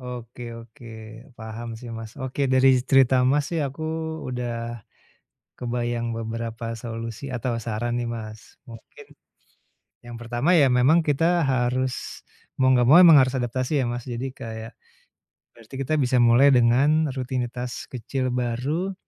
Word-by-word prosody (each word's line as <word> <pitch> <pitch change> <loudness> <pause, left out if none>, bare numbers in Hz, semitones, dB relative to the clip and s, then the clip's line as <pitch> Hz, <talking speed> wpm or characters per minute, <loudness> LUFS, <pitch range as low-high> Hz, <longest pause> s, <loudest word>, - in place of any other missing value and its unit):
Oke 125 -1 -8
oke, 115 +2 -13 0.5
paham 115 +1 -7
sih, 120 +1 -9
Mas. 115 -1 -8
Oke, 135 +1 -1
dari 130 0 +4
cerita, 135 -1 +4
Mas, 145 +2 +1
sih 170 - -1
aku 140 +4 -8 0.5
udah 120 -1 -4 0.8
kebayang 120 -1 -2
beberapa 115 0 -5
solusi 115 +3 -6
atau 120 -1 -3
saran 120 +2 -3
nih, 120 - -3
Mas. 110 -2 -8
Mungkin, 115 -1 -14 1.0
yang 120 -1 -9
pertama 120 +8 0
ya 145 -6 +5
memang 130 +7 +4
kita 165 +4 +1
harus, 130 0 -1 0.4
mau 130 - +4
enggak 125 -2 +4
mau 155 +7 +8
memang 170 -4 +9
harus 130 - -3
adaptasi 130 +4 -1
ya, - - 0
Mas. 120 0 -4
Jadi 125 +1 -4
kayak 110 0 -8 0.8
berarti 115 +3 -16
kita 135 +4 -1
bisa 130 -2 +1
mulai 120 +4 +6
dengan 140 +6 +3
rutinitas 125 -1 -4
kecil 130 +1 -3
baru. 130 +10 -2
125 Hz, 140 wpm, -24 LUFS, 115-135 Hz, 1.0 s, memang